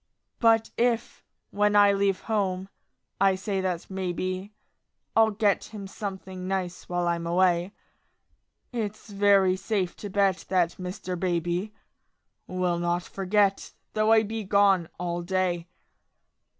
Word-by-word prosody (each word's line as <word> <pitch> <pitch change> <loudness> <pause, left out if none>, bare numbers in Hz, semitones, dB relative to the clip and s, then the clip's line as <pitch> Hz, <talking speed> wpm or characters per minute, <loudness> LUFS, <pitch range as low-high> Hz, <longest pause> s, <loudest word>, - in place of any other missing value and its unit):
But 225 -1 +4
if, 235 -1 0 0.3
when 205 0 +2
I 205 -1 +6
leave 195 -1 +1
home, 195 -3 -1 0.5
I 195 -1 +4
say 195 0 -2
that 180 -3 -2
maybe 185 +1 -3 0.6
I'll 225 0 +6
get 205 -1 +1
him 210 -3 -8
something 190 -2 -6
nice 185 -2 -3
while 175 0 0
I'm 170 -1 -1
away, 175 +1 +2 1.0
It's 215 -2 -4
very 200 -2 +4
safe 190 -2 -2
to 205 - -6
bet 195 -1 +1
that 175 -2 +1
Mr. 180 0 -5
Baby 175 +3 -1 0.7
Will 180 -1 -1
not 175 0 0
forget, 195 +2 0 0.2
though 215 +1 +2
I 225 -1 +6
be 220 +1 -4
gone 195 -3 +3
all 175 -1 -2
day. 175 -1 -1
190 Hz, 125 wpm, -27 LUFS, 180-205 Hz, 1.0 s, I